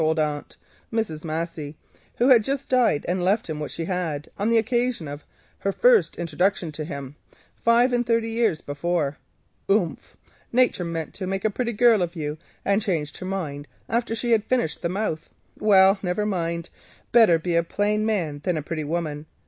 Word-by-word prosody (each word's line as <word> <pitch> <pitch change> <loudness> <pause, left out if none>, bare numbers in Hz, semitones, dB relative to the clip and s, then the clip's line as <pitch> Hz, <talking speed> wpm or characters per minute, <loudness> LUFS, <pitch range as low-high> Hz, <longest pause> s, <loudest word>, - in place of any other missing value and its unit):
"Umph," 155 - +3
said 160 +1 +1
his - - +1
old 150 -1 +1
aunt, 145 - -11 0.3
Mrs. 220 -9 -2
Massey 160 -2 -4 0.4
(who 245 +3 +3
had 240 -4 +7
just 275 +3 -3
died 245 - +3
and 180 0 0
left 200 +5 +1
him 155 -2 -4
what 150 - -4
she 165 - -5
possessed), 165 -4 -3
on 205 +3 +1
the 230 - +4
occasion 240 - 0
of 145 +1 -7 0.4
her 195 - 0
first 485 - +4
introduction 175 +1 0
to 155 +1 -5
him 140 -3 -7 0.4
five 240 +2 +3
and 240 0 +2
thirty 230 -1 +1
years 225 -8 +1
before, 145 0 -2 0.5
"Umph! 195 -4 0 0.3
Nature 240 -7 +2
meant 165 -2 -4
to 185 - -5
make 195 +1 -2
a 215 - +3
pretty 235 +2 -2
girl 230 -1 +5
of 175 0 -2
you, 150 -1 -4 0.3
and 200 +2 +2
changed 165 -8 -2
her 185 - -5
mind 150 -7 -4 0.2
after 230 0 -1
she 235 +1 -2
had 220 -2 +4
finished 240 -8 -1
the 170 - -1
mouth. 185 -4 -3 0.3
Well, 195 -1 +5
never 185 +3 -1
mind, 170 -4 -2 0.4
better 225 -8 +6
be 170 +1 -2
a 170 - +5
plain 205 +5 0
man 170 -10 -1
than 180 -3 0
a 150 - -3
pretty 155 0 -3
woman. 155 -1 -3
180 Hz, 195 wpm, -24 LUFS, 160-225 Hz, 0.5 s, had